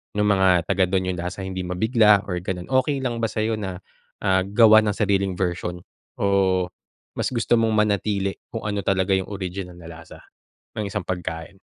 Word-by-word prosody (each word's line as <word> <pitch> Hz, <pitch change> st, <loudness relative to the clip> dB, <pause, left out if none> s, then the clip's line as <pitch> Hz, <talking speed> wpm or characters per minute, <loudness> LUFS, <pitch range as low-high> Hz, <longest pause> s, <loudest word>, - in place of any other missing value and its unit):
nung 105 Hz, 0 st, +2 dB
mga 95 Hz, -4 st, +3 dB
taga 95 Hz, -1 st, +2 dB
dun 95 Hz, -1 st, 0 dB
yung 95 Hz, -, -1 dB
lasa 90 Hz, +3 st, -5 dB
hindi 95 Hz, -1 st, -4 dB
mabigla 105 Hz, +2 st, +3 dB
or 90 Hz, -, -2 dB
ganun. 90 Hz, -2 st, -4 dB
Okey 130 Hz, +2 st, +1 dB
lang 120 Hz, -3 st, -3 dB
ba 115 Hz, -, +1 dB
sa'yo, 110 Hz, +1 st, -1 dB
na 95 Hz, -4 st, -5 dB, 0.7 s
gawan 110 Hz, 0 st, +7 dB
ng 100 Hz, -, -7 dB
sariling 100 Hz, -2 st, +1 dB
version, 90 Hz, -1 st, -2 dB, 0.4 s
o 95 Hz, -2 st, +2 dB, 0.5 s
mas -, -, -2 dB
gusto 120 Hz, -1 st, +1 dB
mong 115 Hz, -1 st, +2 dB
manatili 105 Hz, -2 st, 0 dB, 0.2 s
kung 110 Hz, -1 st, -5 dB
ano 100 Hz, -1 st, -2 dB
talaga 95 Hz, 0 st, +1 dB
yung 95 Hz, +1 st, -3 dB
original 90 Hz, -2 st, -6 dB
na 85 Hz, -, -11 dB
lasa 85 Hz, 0 st, -12 dB, 0.5 s
ng 105 Hz, -2 st, -3 dB
isang 90 Hz, -, -4 dB
pagkain? 90 Hz, 0 st, -5 dB
100 Hz, 175 wpm, -23 LUFS, 90-110 Hz, 0.7 s, gawan